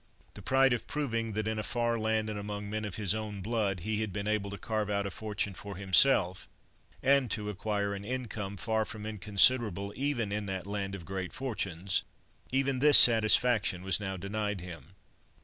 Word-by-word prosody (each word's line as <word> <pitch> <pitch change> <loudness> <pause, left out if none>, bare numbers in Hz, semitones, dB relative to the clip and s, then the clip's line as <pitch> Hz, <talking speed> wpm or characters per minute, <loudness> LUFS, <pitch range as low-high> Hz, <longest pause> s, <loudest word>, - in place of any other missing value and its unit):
The - - -10
pride 135 -1 +3
of 115 -2 -3
proving 115 -7 -2
that 110 +1 -2
in 110 0 -1
a - - 0
far 120 +1 -1
land, 110 0 0
and 105 -1 -4
among 105 0 -5
men 110 +1 -3
of 100 - -5
his 100 -3 0
own 105 -3 -5
blood, 105 -4 -1
he 110 +3 -1
had 110 -2 -2
been 100 +2 -4
able 105 -2 0
to 100 - -6
carve 110 0 -2
out 100 -1 0
a 100 - -3
fortune 105 -1 -3
for 100 +2 -8
himself, 95 0 +3 0.5
and 135 -2 +3
to 105 0 -3
acquire 100 0 -2
an 100 0 -6
income, 105 -4 -4
far 110 +3 0
from 105 0 -8
inconsiderable 105 -1 +3
even 130 -6 -1
in 105 0 -3
that 95 -2 -4
land 100 -1 -3
of 85 -4 -9
great 95 +1 -5
fortunes: 100 -8 -2 0.5
even 135 0 +1
this 145 +1 +7
satisfaction 110 -4 +4
was 95 0 +1
now 95 -2 -4
denied 105 +2 -3
him. 85 -1 -10
105 Hz, 190 wpm, -30 LUFS, 100-115 Hz, 0.5 s, this